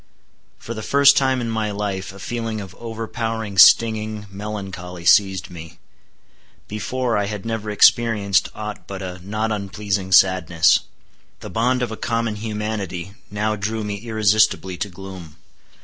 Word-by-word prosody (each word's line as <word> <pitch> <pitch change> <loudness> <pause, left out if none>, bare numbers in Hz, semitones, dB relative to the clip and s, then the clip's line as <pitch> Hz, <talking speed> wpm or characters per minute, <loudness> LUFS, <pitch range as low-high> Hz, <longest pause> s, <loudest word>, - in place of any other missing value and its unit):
For 115 - -7
the 110 - -6
first 140 +4 +5
time 130 -2 +2
in 115 - -3
my 110 -1 -1
life 100 -2 -3
a 100 - -13
feeling 115 +2 -4
of 95 -3 -8
overpowering 115 -2 -4
stinging 110 0 +5
melancholy 95 -4 -7
seized 95 0 +4
me. 80 -2 -10 0.9
Before, 115 +2 -1
I 100 - -1
had 105 -1 -6
never 110 -2 -3
experienced 105 -1 +3
aught 105 0 -7
but 95 -1 -6
a 90 -1 -6
not 110 +3 -2
unpleasing 100 -2 -3
sadness. 90 -3 +5 0.6
The - - -8
bond 125 +3 +1
of 120 - -3
a 110 - -5
common 115 -2 -2
humanity 105 -4 -4 0.2
now 105 +1 -1
drew 110 +2 -3
me 105 -1 -3
irresistibly 110 -3 +1
to 100 +3 -3
gloom. 95 -4 -10
105 Hz, 145 wpm, -21 LUFS, 95-110 Hz, 0.9 s, first